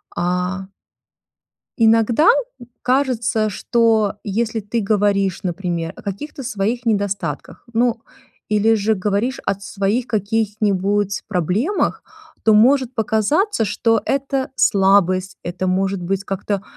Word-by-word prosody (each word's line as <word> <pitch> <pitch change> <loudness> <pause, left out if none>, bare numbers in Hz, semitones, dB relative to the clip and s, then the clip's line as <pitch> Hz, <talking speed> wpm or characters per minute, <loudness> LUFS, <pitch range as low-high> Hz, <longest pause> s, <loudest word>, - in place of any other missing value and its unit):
а 180 +2 -2 1.1
иногда 230 - +4 0.5
кажется, 245 -4 +1
что 220 0 +1
если 225 +2 -2
ты 220 +3 -2
говоришь, 200 -2 +1
например, 175 -2 -3
о - - -12
каких-то 270 - -6
своих 235 0 -2
недостатках, 205 -3 -2
ну, 230 0 +1 0.5
или 215 +1 +3
же 220 +1 +1
говоришь 210 +6 -1
о - - +1
своих 200 +4 -1
каких-нибудь 205 -2 0
проблемах, 205 - 0 0.4
то 220 - +5
может 255 +3 +4
показаться, 225 - +1
что 225 +3 +1
это 275 -1 -1
слабость, 190 -4 +2
это 180 +2 -3
может 190 +1 0
быть 195 +2 -2
как-то, 195 0 -3
210 Hz, 105 wpm, -20 LUFS, 195-230 Hz, 1.1 s, то